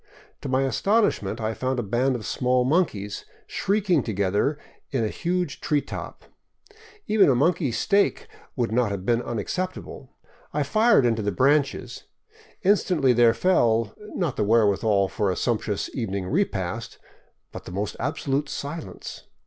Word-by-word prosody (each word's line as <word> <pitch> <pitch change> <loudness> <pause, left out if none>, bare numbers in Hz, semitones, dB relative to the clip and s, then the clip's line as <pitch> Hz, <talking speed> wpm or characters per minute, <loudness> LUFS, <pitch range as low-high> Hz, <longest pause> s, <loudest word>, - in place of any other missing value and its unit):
To - - -5
my 130 +1 +2
astonishment, 135 - +1
I 110 0 -1
found 130 +3 -2
a 120 - -1
band 125 +6 +1
of 110 -4 -6
small 125 0 +1
monkeys 125 - 0 0.2
shrieking 195 -6 +1
together 105 +6 0 0.3
in 130 -4 -1
a - - -1
huge 180 +5 -2
tree 150 -2 +1
top. - - -8 0.8
Even 210 -7 +4
a 130 - +4
monkey 145 0 +2
steak 200 - +1 0.3
would 120 -4 -1
not 120 -1 +2
have 100 -2 -5
been 120 +1 +2
unacceptable. 130 - -4 0.5
I 150 - +2
fired 215 - +4
into 115 -2 +1
the 105 0 -1
branches. 135 +2 +1 0.6
Instantly 180 -9 +3
there 120 -1 +5
fell, 115 - +2 0.2
not 165 -9 -1
the - - +1
wherewithal 105 -2 +3
for 100 +2 -1
a 90 - 0
sumptuous 110 -4 -1
evening 100 -6 -3
repast, 115 - -2 0.5
but - - -9
the - - -8
most 100 +3 -3
absolute 140 +1 -1
silence. 145 +3 -7
125 Hz, 145 wpm, -25 LUFS, 110-150 Hz, 0.8 s, there